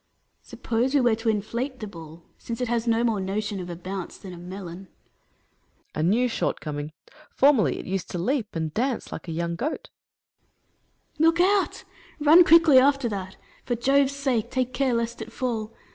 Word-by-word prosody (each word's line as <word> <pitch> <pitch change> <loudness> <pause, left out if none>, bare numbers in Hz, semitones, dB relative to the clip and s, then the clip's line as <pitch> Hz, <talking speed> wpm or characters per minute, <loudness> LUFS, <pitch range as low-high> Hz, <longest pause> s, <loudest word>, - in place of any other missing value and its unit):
Atlas. - - -23
Suppose 245 +3 -1
we 280 - +5
were 240 -2 +3
to 225 +1 -2
inflate 235 +5 -2
the 215 - -5
ball, 165 -4 -11
since 230 -1 -7
it 250 - -1
has 235 0 -1
no 230 0 +2
more 225 -4 +1
notion 200 +1 -3
of 180 -1 -6
a 175 - -5
bounce 185 +1 -6
than 190 -2 -10
a - - -10
melon. 180 0 -8
Hercules. - - -41
A 155 - -2
new 215 +10 +3
shortcoming! 150 -9 -3 0.4
Formerly 255 - +3
it - - -7
used 190 -1 -3
to - - -4
leap 220 +4 -1
and 160 -2 -3
dance 250 +1 -2
like - - -7
a - - -4
young 170 +1 -2
goat. 300 - -4 1.2
Atlas. - - -34
Look 330 +1 +2
out! 390 +2 +2 0.4
Eun 310 +4 +7
quickly 330 -5 +7
after 275 -1 +3
that. 190 -2 -6 0.3
For 240 - -1
Jove's 275 +3 +2
sake, 265 -6 -1
take 255 -1 -1
care 260 -1 +1
lest 235 0 -2
it 220 +1 -7
fall 225 -3 -3
230 Hz, 190 wpm, -25 LUFS, 190-260 Hz, 1.2 s, Eun